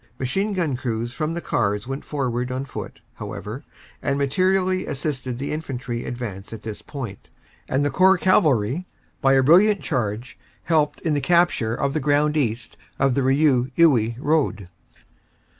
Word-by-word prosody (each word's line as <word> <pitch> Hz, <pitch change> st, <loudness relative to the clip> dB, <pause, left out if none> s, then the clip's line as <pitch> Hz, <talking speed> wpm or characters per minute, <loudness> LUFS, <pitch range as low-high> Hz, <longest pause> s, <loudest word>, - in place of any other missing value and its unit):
Machine 195 Hz, +12 st, -1 dB
gun 165 Hz, -8 st, 0 dB
crews 120 Hz, -1 st, -3 dB
from 155 Hz, +3 st, -2 dB
the 170 Hz, -, -3 dB
cars 105 Hz, -6 st, 0 dB
went 135 Hz, +1 st, -4 dB
forward 125 Hz, -3 st, -2 dB
on 130 Hz, +2 st, -3 dB
foot, 140 Hz, -, -8 dB
however, 115 Hz, +8 st, -7 dB, 0.4 s
and 140 Hz, -1 st, 0 dB
mater 145 Hz, +7 st, +2 dB
ially 185 Hz, -1 st, 0 dB
assisted 130 Hz, -3 st, -3 dB
the 140 Hz, +3 st, -4 dB
Infantry 135 Hz, -6 st, -4 dB
advancing 115 Hz, -3 st, -6 dB
at -, -, -21 dB
this 110 Hz, -2 st, -6 dB
point, 120 Hz, -9 st, -8 dB, 0.4 s
and 140 Hz, +2 st, +1 dB
the 145 Hz, -, 0 dB
Corps 190 Hz, +5 st, +5 dB
Cavalry, 155 Hz, -, +2 dB, 0.3 s
by 135 Hz, -1 st, +4 dB
a 135 Hz, -1 st, +4 dB
brilliant 190 Hz, +8 st, +5 dB
charge, 115 Hz, 0 st, -3 dB, 0.2 s
helped 155 Hz, -3 st, +1 dB
in 160 Hz, -, 0 dB
the 145 Hz, -, 0 dB
capture 170 Hz, -8 st, +2 dB
of 140 Hz, +1 st, -1 dB
the 155 Hz, -, 0 dB
ground 150 Hz, +1 st, +2 dB
east 120 Hz, -6 st, -2 dB, 0.2 s
of 135 Hz, -1 st, +2 dB
the 140 Hz, -, +1 dB
Rieux 135 Hz, -1 st, +3 dB
Iwuy 120 Hz, -9 st, +4 dB
road. 140 Hz, -, 0 dB
135 Hz, 160 wpm, -23 LUFS, 120-155 Hz, 0.4 s, Corps